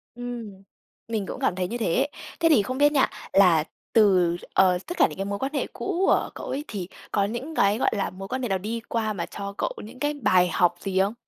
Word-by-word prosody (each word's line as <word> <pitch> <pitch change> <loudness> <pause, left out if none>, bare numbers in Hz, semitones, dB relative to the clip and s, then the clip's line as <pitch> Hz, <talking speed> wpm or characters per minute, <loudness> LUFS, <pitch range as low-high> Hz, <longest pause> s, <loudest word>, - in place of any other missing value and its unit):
Ừm, 235 -5 -7 0.4
mình 220 -4 -2
cũng - - -6
cảm 180 - +1
thấy 180 -1 -1
như 240 +4 -4
thế. 245 +6 +1 0.3
Thế 330 -1 +4
thì 285 -9 +6
không 255 +5 -4
biết 290 +1 +5
nha, 275 -3 +3 0.2
là 175 -6 +6 0.3
từ, 185 -6 +4 0.2
ờ, 185 -2 +4
tất 350 - -5
cả - - +6
những - - -10
cái 195 - -2
mối 200 0 -3
quan 275 +3 -3
hệ 280 - -1
cũ 385 -1 -1
của - - +3
cậu - - -7
ấy 280 +3 -3
thì 185 -4 -5 0.2
có 200 - +2
những 255 +9 -5
cái, 200 +2 +3
gọi - - +2
là, 200 -2 -1
mối 195 +2 -8
quan 260 +3 -3
hệ 245 - -1
nào 190 - +1
đi 220 +5 -4
qua 220 -2 0
mà 170 -3 -3
cho 200 0 -6
cậu - - -1
những 240 +4 -11
cái 295 0 0
bài 185 -9 +3
học 175 -1 +3
gì 190 -1 -1
không? 200 +3 +2
210 Hz, 250 wpm, -25 LUFS, 190-255 Hz, 0.4 s, thì